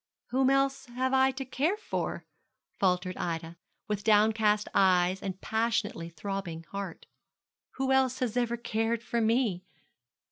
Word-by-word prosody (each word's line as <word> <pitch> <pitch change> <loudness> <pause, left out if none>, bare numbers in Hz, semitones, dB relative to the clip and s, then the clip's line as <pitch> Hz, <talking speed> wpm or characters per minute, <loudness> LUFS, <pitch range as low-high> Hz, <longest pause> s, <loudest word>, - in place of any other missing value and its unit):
'Whom 260 +1 +3
else 275 0 +1
have 255 +2 -1
I 265 0 +5
to 265 +1 -5
care 305 - 0
for?' 430 - -4 0.5
faltered 180 -1 +1
Ida, 165 0 -4 0.3
with 210 -1 -2
downcast 215 0 +3
eyes 185 0 +3
and 190 -1 -4
passionately 220 -6 -1
throbbing 170 -1 -5
heart. 195 -4 -6 0.7
'Who 265 0 -1
else 260 -1 +3
has 250 -4 -2
ever 240 -1 0
cared 225 0 -1
for 235 -1 -1
me?' 220 -5 +1
220 Hz, 135 wpm, -29 LUFS, 190-255 Hz, 0.7 s, I